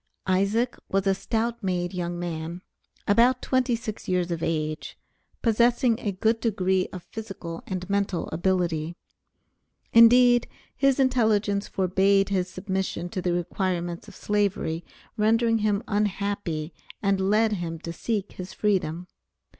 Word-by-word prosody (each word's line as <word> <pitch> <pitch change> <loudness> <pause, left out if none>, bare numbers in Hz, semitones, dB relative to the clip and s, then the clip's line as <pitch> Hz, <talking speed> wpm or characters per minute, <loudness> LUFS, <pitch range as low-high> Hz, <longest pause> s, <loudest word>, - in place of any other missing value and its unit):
Isaac 200 +6 +1
was 195 0 +1
a 195 - +4
stout 230 +4 -2
made 180 -1 -1
young 175 -1 -3
man, 170 +1 -5 0.4
about 240 +5 +4
twenty 255 -2 +1
six 220 -2 -6
years 180 -1 0
of 165 -1 -2
age, 155 -2 -2 0.5
possessing 235 +1 +3
a 205 - -2
good 220 +4 +1
degree 190 -5 +1
of 180 - -8
physical 195 -6 -7
and 185 -1 -4
mental 200 -3 -1
ability. 170 -2 0 1.0
Indeed 240 +1 +7 0.3
his 275 -1 +2
intelligence 220 -6 +2
forbade 195 +1 +2
his 185 -2 0
submission 190 -2 -3
to 185 - -3
the 180 - 0
requirements 175 0 -2
of - - -12
Slavery, 200 -5 -1 0.3
rendered 225 +1 +3
him 210 0 +1
unhappy 200 -6 -1 0.3
and 195 -1 +1
led 220 +1 +3
him 170 -5 -3
to 170 0 -5
seek 205 +3 -2
his 185 0 -8
freedom. 180 -5 0
195 Hz, 130 wpm, -26 LUFS, 175-220 Hz, 1.0 s, Indeed